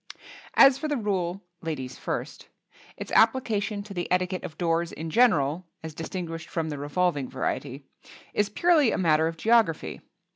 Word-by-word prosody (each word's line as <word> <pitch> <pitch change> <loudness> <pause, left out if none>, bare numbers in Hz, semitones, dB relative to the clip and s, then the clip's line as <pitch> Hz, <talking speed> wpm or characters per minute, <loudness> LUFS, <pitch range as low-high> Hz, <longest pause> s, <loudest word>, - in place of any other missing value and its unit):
As 270 -1 +7
for 310 - -2
the 295 -2 -1
rule 195 -4 -2 0.2
"Ladies 145 -6 -5
first," - - -5 0.5
its - - -7
application 220 -3 +2
to 200 -1 -10
the 175 -2 -4
etiquette 180 0 0
of 160 - -8
doors 170 -1 0
in 160 +1 -6
general 170 - +3 0.2
(as 160 -1 -6
distinguished 165 0 -6
from 160 -2 -2
the 145 -2 -5
revolving 145 -1 0
variety) 135 +1 -4 0.5
is 210 0 +1
purely 310 +2 +3
a - - -1
matter 160 -3 +3
of 165 0 -5
geography. 225 -5 +2
175 Hz, 155 wpm, -26 LUFS, 160-210 Hz, 0.5 s, As